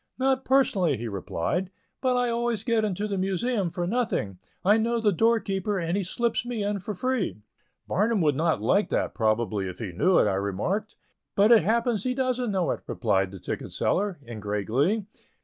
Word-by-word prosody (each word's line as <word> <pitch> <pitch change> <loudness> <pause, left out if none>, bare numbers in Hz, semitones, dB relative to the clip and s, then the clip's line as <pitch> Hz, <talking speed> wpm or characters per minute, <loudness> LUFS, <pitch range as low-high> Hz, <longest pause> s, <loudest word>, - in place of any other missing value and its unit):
"Not 265 0 +1
personally," 200 - +3
he 115 +2 -5
replied; 105 - -2 0.3
"but 255 -1 +2
I 245 0 +2
always 235 -2 -1
get 230 -2 +1
into 210 0 -1
the 200 -2 -2
Museum 195 +1 0
for 175 +1 -3
nothing. 190 - -1 0.3
I 205 +3 +6
know 230 +1 +1
the 215 -2 +3
doorkeeper, 205 -1 +1
and 170 0 -1
he 200 - +1
slips 230 +6 0
me 240 -3 -3
in 205 0 -1
free." 195 - -2 0.4
"Barnum 215 +3 +1
would 150 -3 +3
not 160 -7 +1
like 200 - +2
that, - - -1
probably, 110 -3 0
if 90 - -8
he 110 -6 -5
knew 180 - +3
it," - - +5
I 100 - +1
remarked. 100 - -2 0.4
"But 205 +3 +5
it 230 -3 +8
happens 230 +2 +1
he 250 0 -1
don't 255 -2 0
know 190 -4 0
it," - - -3
replied 100 -5 +1
the 95 0 -10
ticket - - -5
seller, 200 -2 0
in 115 -2 -7
great 105 -1 -2
glee. 165 - +1
195 Hz, 190 wpm, -26 LUFS, -, 0.4 s, it